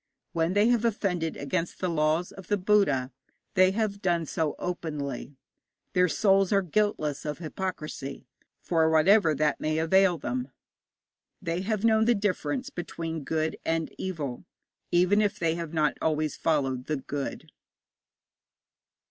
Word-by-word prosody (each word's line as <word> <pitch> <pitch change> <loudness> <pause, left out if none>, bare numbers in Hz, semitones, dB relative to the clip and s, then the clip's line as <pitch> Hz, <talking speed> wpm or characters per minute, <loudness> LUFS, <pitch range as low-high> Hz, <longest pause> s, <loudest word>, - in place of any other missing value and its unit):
When 165 0 0
they 205 +3 +4
have 240 -2 +2
offended 185 -7 -1
against 155 +4 -2
the 185 - 0
laws 160 +1 +1
of 190 -2 -12
the 205 - +1
Buddha 180 -10 +2 0.4
they 185 0 +5
have 205 -2 -1
done 170 -2 +1
so 155 0 -1
openly. 145 -6 -4 0.6
Their 180 0 +4
souls 195 +1 +3
are 200 -1 +3
guiltless 170 -6 0
of 150 -1 -3
hypocrisy 155 -5 -5 0.4
for 160 -2 +2
whatever 160 +1 +5
that 150 0 +1
may 155 0 -1
avail 180 +2 +4
them. 125 -1 -3 0.9
They 170 +2 -2
have 215 +2 -1
known 220 -1 +4
the 240 +1 +4
difference 235 +7 -1
between 165 - -5
good 160 +1 -1
and 165 -1 -1
evil, 150 -9 -4 0.5
even 180 +4 +4
if 210 0 0
they 165 -3 +1
have 165 -2 -5
not 155 -2 +1
always 155 -1 0
followed 135 -5 0
the 155 - 0
good. 140 +1 -5
165 Hz, 140 wpm, -27 LUFS, 155-195 Hz, 0.9 s, they